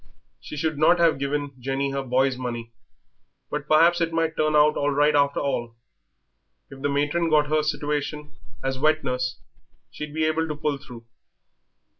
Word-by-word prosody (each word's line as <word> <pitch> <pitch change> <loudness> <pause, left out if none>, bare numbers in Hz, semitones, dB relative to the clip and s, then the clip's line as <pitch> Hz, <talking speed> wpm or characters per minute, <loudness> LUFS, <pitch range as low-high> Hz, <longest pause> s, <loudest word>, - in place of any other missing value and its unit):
She 150 - -9
should 155 0 -1
not 165 +3 +5
have 165 -4 +3
given 145 +1 -2
Jenny 135 +2 -2
her 140 0 -2
boy's 130 0 +1
money.... 120 -2 -5 0.8
But 150 0 -4
perhaps 170 +3 +4
it 165 0 +1
might 165 -1 0
turn 155 0 +1
out 150 0 +5
all 145 - 0
right 145 +1 +3
after 140 0 +2
all. 120 -4 -2 1.0
If 135 0 -11
the 145 - 0
matron 145 +4 0
got 150 -1 +4
her 155 0 +3
a - - -1
situation 150 0 -3 0.3
as 135 0 -2
wet 155 +2 +2
nurse 125 0 -2 0.5
she'd 150 0 -7
be 160 - 0
able 160 +1 0
to 150 - -4
pull 150 -2 -2
through. 120 -4 -12
145 Hz, 175 wpm, -24 LUFS, 135-155 Hz, 1.0 s, not